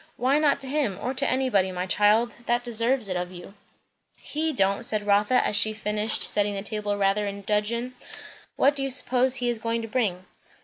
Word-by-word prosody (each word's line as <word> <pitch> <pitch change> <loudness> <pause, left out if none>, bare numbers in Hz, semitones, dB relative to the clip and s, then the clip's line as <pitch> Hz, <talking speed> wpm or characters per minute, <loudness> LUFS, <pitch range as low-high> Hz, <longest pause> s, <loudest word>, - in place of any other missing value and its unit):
"Why 265 +4 +2
not 290 -2 +2
to 270 - -8
him, 265 -9 -1
or 255 - -3
to 275 +1 -1
anybody, 250 -8 +1
my 180 0 -3
child, 210 +5 +2
that 240 +1 +1
deserves 235 0 0
it 185 - -3
of 180 0 -3
you?" 175 +2 -11 0.6
"He 315 +2 -2
don't!" 200 -7 +1
said 210 -1 -1
Rotha, 210 +5 +3
as - - -1
she 215 +1 +1
finished 210 0 -1
setting 205 0 +1
the 195 - -4
table, 210 -1 -3
rather 200 +1 +1
in 200 0 -6
dudgeon. 230 +5 -1 0.6
"What 280 +2 +3
do 275 - -2
you 270 - -1
suppose 255 0 +2
he 245 -2 0
is 235 - -4
going 230 +1 -2
to - - -5
bring?" 205 -6 -1
220 Hz, 205 wpm, -25 LUFS, 205-255 Hz, 0.6 s, Rotha